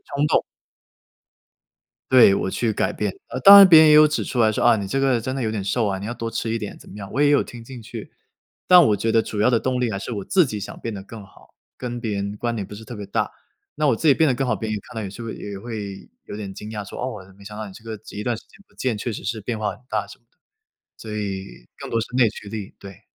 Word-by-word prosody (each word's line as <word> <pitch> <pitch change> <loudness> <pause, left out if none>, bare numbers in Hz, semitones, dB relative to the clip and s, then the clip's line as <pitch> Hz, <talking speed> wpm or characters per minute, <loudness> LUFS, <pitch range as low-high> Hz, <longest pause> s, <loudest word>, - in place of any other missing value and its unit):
冲 145 +2 +2
动 - - +3 1.7
对， 125 -6 +7
我 - - -2
去 115 +1 -1
改 - - -1
变。 105 -3 -2 0.3
当 200 +1 +12
然 195 -1 +10
别 160 -3 +9
人 160 - +7
也 150 - +7
有 155 0 +8
指 150 - -1
出 130 - -4
来 110 -2 +4
说： - - -2
“啊， 120 -1 +6
你 100 -2 -4
这 135 +8 -1
个 135 -3 +2
真 130 +4 -4
的 135 - -3
有 110 - -1
点 110 -3 -3
瘦 110 +3 0
啊， 95 -1 -2
你 100 - -6
要 120 - -4
多 115 -1 -5
吃 115 - -3
一 115 - -1
点。” 105 -2 -7
怎 - - -16
么 100 - -11
样， 100 -2 -8
我 135 - -1
也 145 0 +5
有 145 - +4
听 120 -1 -11
进 125 -1 -10
去。 115 -1 -9 0.6
但 180 -2 +8
我 105 - +2
觉 115 - -1
得 115 - +4
主 105 -1 -4
要 120 - +4
的 120 - +3
动 125 +1 -1
力， 120 -3 0
还 100 - -3
是 115 +4 -6
我 100 -3 -4
自 180 - +3
己 105 -4 -5
想 - - -7
变 115 - -5
得 95 - -7
更 105 +1 -11
好， 95 - -21 0.2
跟 120 -1 -5
别 110 -3 -3
人 100 +1 -3
关 120 +2 -2
联 105 -3 -3
不 105 - -10
是 110 - -11
特 120 - -9
别 105 -2 -7
大， - - -1 0.4
那 150 0 +1
我 115 - +3
自 160 - -3
己 140 - +7
变 160 +2 +3
得 130 - +2
更 135 +1 -1
好， 110 - +1
别 110 +2 -5
人 110 - -1
也 - - -6
看 - - -14
到 110 - -4
也 100 - -5
是 110 +5 -9
会 115 -1 -5
也 100 -1 -7
会 105 -3 -7 0.2
有 - - -7
点 100 -2 -6
惊 105 - -8
讶， 105 -2 -5
说： - - -9
“哦， 100 -7 -6
没 100 - -16
想 105 +1 -9
到 110 - -5
你 100 - -10
这 100 - -14
个 110 -2 -7
一 105 - -5
段 120 +1 -1
时 - - -12
间 - - -31 0.2
不 - - -28
见， 125 -4 -2
确 115 +2 -4
实 - - -7
是 110 +2 -3
变 115 +1 -4
化 105 -1 -1
很 - - -16
大。” - - -2
什 - - -13
么 120 - -41
的， - - -42 0.6
所 110 -1 -8
以 100 -3 -3 0.3
更 - - -8
多 115 - +1
是 115 - -3
内 125 -3 +5
驱 100 - -11
力， 105 -2 -7
对。 100 +1 -12
110 Hz, 325 characters per minute, -22 LUFS, 105-125 Hz, 1.7 s, 当